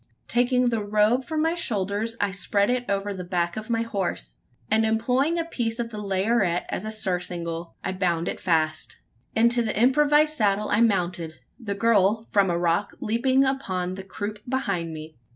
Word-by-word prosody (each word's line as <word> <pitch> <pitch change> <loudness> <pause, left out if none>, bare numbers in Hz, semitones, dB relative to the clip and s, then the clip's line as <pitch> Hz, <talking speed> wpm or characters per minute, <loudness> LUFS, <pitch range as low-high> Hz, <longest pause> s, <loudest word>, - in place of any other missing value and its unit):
Taking 250 0 +2
the 225 -3 -1
robe 215 +5 +2
from 315 -1 -1
my 325 +1 +2
shoulders, 220 - -2
I 205 - +1
spread 200 +3 +1
it 250 -2 -2
over 200 0 -1
the 185 -2 -6
back 175 -1 -1
of 215 +1 -6
my 230 -1 +1
horse; 200 -5 -3 0.3
and 220 +1 +2
employing 250 +8 +1
a 335 - -1
piece 235 -8 -2
of 235 -1 -3
the 210 -1 -6
laryette 195 -2 +1
as 200 - -3
a 215 - -3
surcingle, 175 -5 -3
I - - -1
bound 175 -3 -1
it - - -3
fast. 155 -2 0 0.4
Into 235 +2 +4
the 215 -2 -1
improvised 295 +5 +4
saddle 210 -3 +1
I 210 - +2
mounted 175 -7 +1 0.2
the 205 -5 -4
girl, 220 0 +2
from 200 -2 +3
a 170 - +1
rock, 170 +3 0
leaping 260 +5 +2
upon 185 -10 -2
the 195 - -6
croup 205 +2 -6
behind 180 -11 -1
me. 155 0 -9
210 Hz, 180 wpm, -25 LUFS, 185-235 Hz, 0.4 s, Into